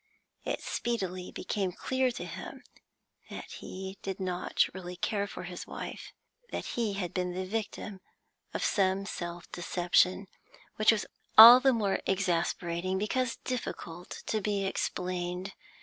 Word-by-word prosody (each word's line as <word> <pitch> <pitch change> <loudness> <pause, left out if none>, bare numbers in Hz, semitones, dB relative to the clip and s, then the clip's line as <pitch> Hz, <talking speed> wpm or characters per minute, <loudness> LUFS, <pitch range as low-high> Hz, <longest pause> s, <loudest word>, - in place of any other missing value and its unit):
It - - -2
speedily 185 -6 -2
became 195 -3 -2
clear 260 +6 0
to 240 - -5
him - - -8 0.7
that - - -8
he 190 +1 -7
did 195 0 -4
not 180 -1 +1
really 180 -1 -7
care 200 +2 -1
for - - -7
his 180 0 -7
wife, - - -7 0.4
that - - -4
he 225 -4 0
had 185 -4 -3
been 180 -1 -1
the 185 0 -2
victim 210 -1 -4 0.5
of - - -3
some 195 0 +2
self 175 -3 -6
deception, 180 +2 +2 0.5
which 215 +1 +6
was 220 -2 0 0.3
all 235 +3 +13
the 265 +1 +4
more 210 -5 +1
exasperating 180 -1 0
because 235 +5 0
difficult 180 -8 -5
to 215 - -1
be 200 -1 0
explained. 180 0 -2
190 Hz, 135 wpm, -30 LUFS, 180-210 Hz, 0.7 s, all